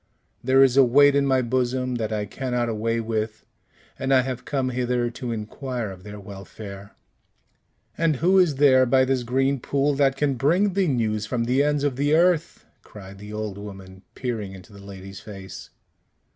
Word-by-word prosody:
There 135 +2 +5
is 130 -1 +3
a 135 - +8
weight 140 +3 +5
in 140 -1 +2
my 130 -1 +2
bosom 125 +1 -1
that 110 -2 -3
I 105 -1 -2
cannot 125 +2 -2
away 115 +1 -1
with, 110 -1 -3 0.5
and 135 0 -2
I 130 -1 +6
have 125 -1 -5
come 135 -3 -1
hither 125 -1 -1
to 125 0 -5
inquire 115 +1 -4
of 95 -1 -11
their 105 +1 -9
welfare." 100 0 -10 1.0
"And 165 -2 +2
who 180 +8 +3
is 170 -6 +3
there 130 -2 +5
by 130 +1 +4
this 130 -1 0
green 135 +3 0
pool 140 +3 0
that 135 -1 +2
can 145 -1 +1
bring 180 - +2
thee 190 -1 +1
news 110 -6 -1
from 120 0 -1
the 125 +4 +2
ends 145 0 +1
of 140 -4 -1
the 145 +2 +2
earth?" 170 -1 +1 0.2
cried 100 -1 -12
the 105 +1 -10
old 105 -2 -5
woman, 95 -2 -10
peering 110 -6 -4
into 95 +2 -13
the 100 - -13
lady's 95 0 -10
face. 95 -3 -10
125 Hz, 185 wpm, -24 LUFS, 105-135 Hz, 1.0 s, a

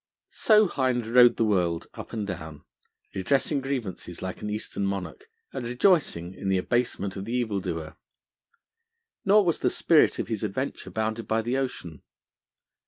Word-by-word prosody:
So 215 -1 +4
Hind 130 -7 0
rode 120 +1 +6
the 115 - +2
world 90 -5 +1
up - - -9
and 110 -2 -3
down, 80 -6 -7 0.5
redressing 135 - +1
grievances 120 -10 -4
like 95 0 -6
an 105 - -4
Eastern 105 -1 -4
monarch, 100 - -4 0.3
and - - -4
rejoicing 120 - +1
in 95 - -4
the 95 - +3
abasement 100 -1 -1
of 95 - -5
the 115 - -4
evildoer. 100 -10 -2 1.3
Nor 200 +1 +5
was 170 - +1
the - - +2
spirit 165 -3 +3
of - - -3
his 110 -3 -3
adventure 110 +7 -3
bounded 110 +1 -3
by 110 0 +1
the 120 +3 -1
ocean. 125 - -4
110 Hz, 155 wpm, -26 LUFS, 95-130 Hz, 1.3 s, rode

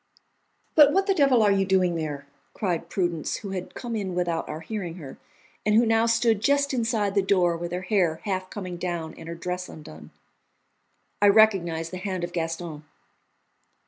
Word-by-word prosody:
"But 295 -2 +7
what 390 +5 +2
the 390 - +2
devil 275 -9 +4
are 205 - +4
you 195 -1 +3
doing 185 -2 +2
there?" 150 -4 -4 0.3
cried 180 -5 -2
Prudence, 175 -4 -1
who 200 -3 -6
had 185 -1 -6
come 235 -2 -5
in 190 -4 -3
without 175 -2 -1
our 155 - -5
hearing 180 -2 -5
her, 145 -7 -10 0.4
and 210 0 +2
who 235 +2 +5
now 225 0 +3
stood 230 -2 +2
just 280 +3 +2
inside 225 -5 0
the 200 - +3
door, 180 -3 +2
with 170 +1 -5
her 180 +1 -3
hair 180 -5 +1
half 185 -2 -3
coming 185 -4 -6
down 170 -3 -4
and 165 - -10
her 170 - -5
dress 180 +2 -4
undone. 80 - -11 1.1
I 205 - +6
recognised 190 -6 +3
the 185 - -5
hand 185 -1 -4
of 175 0 -4
Gaston. 165 -2 -4
185 Hz, 180 wpm, -25 LUFS, 170-215 Hz, 1.1 s, But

